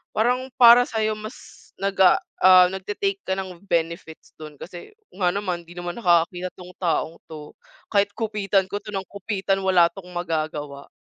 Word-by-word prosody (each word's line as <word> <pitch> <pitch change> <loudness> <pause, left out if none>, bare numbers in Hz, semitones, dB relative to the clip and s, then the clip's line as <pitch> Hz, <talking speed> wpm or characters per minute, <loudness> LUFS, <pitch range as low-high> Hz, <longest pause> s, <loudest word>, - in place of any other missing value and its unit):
parang 250 +4 0
para 240 0 +8
sayo 220 -1 -1
mas 215 +3 -12
nag 195 0 -2
ah, 185 - +5 0.2
ah, 185 -1 +8
nagte-take 205 - -3
ka - - -5
ng 185 -1 -7
benefits 165 -2 -3
dun 155 -1 -11
kasi 175 - -10 0.2
nga 185 -2 +1
naman, 185 -4 -3
"Di - - -14
naman 175 0 -5
nakakakita 180 -2 +1
tong 180 0 -12
taong 165 -2 -1 0.2
to. 150 -1 -10 0.4
Kahit 200 -1 +2
kupitan 205 -3 0
ko 195 - -6
to 210 - -9
ng 195 -1 -4
kupitan 195 -1 -2
wala 185 -3 +5
tong 180 -1 -12
magagawa" 155 -5 -4
185 Hz, 165 wpm, -23 LUFS, 175-205 Hz, 0.4 s, para